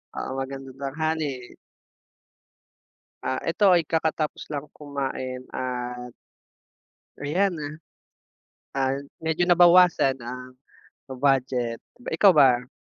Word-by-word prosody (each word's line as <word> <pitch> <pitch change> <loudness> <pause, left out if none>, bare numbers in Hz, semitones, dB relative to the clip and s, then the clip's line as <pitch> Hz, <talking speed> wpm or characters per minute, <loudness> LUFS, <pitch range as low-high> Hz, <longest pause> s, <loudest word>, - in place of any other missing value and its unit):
Oo, 135 +1 -4
magandang 135 0 -7
tanghali. 145 -2 -3 1.7
Ah, 130 - -1
ito 190 +3 +4
ay 170 -3 +3
kakatapos 160 -2 -1
lang 145 0 -4
kumain 135 -3 -5
at 125 -1 -4 1.1
ayan, 180 +6 +1
ah. 145 +1 -5 1.0
Ah, 135 0 0 0.2
medyo 160 +2 +1
nabawasan 175 -5 +6
ang 125 +2 -8 0.5
budget 130 -3 0 0.2
ba. 245 - -13
Ikaw 200 - +7
ba? 125 -4 +5
135 Hz, 95 wpm, -25 LUFS, 130-160 Hz, 1.7 s, Ikaw